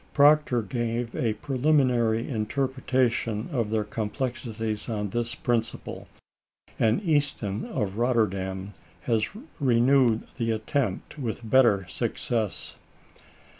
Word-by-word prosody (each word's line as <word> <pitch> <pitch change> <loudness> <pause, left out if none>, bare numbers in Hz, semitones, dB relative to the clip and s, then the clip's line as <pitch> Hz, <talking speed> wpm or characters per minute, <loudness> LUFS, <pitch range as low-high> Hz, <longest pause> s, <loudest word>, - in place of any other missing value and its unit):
Proctor 145 -5 +5
gave 120 +2 -2
a 115 -3 +1
preliminarily 125 -3 +2
interpretation 125 -2 0
of 120 -7 0
their 110 -1 +1
complexities 110 0 -3
on 105 -3 -2
this 120 +1 -2
principle, 115 -2 -2 0.7
and 115 - +2
Easton 140 - 0
of 105 -3 -3
Rotterdam 100 -5 0 0.3
has 110 -2 +1 0.3
renewed 125 -2 +4
the 115 -1 -1
attempt 110 +3 -2
with 115 -3 -4
better 110 -6 +4
success. 110 +3 -3
115 Hz, 95 wpm, -26 LUFS, 110-130 Hz, 0.7 s, Proctor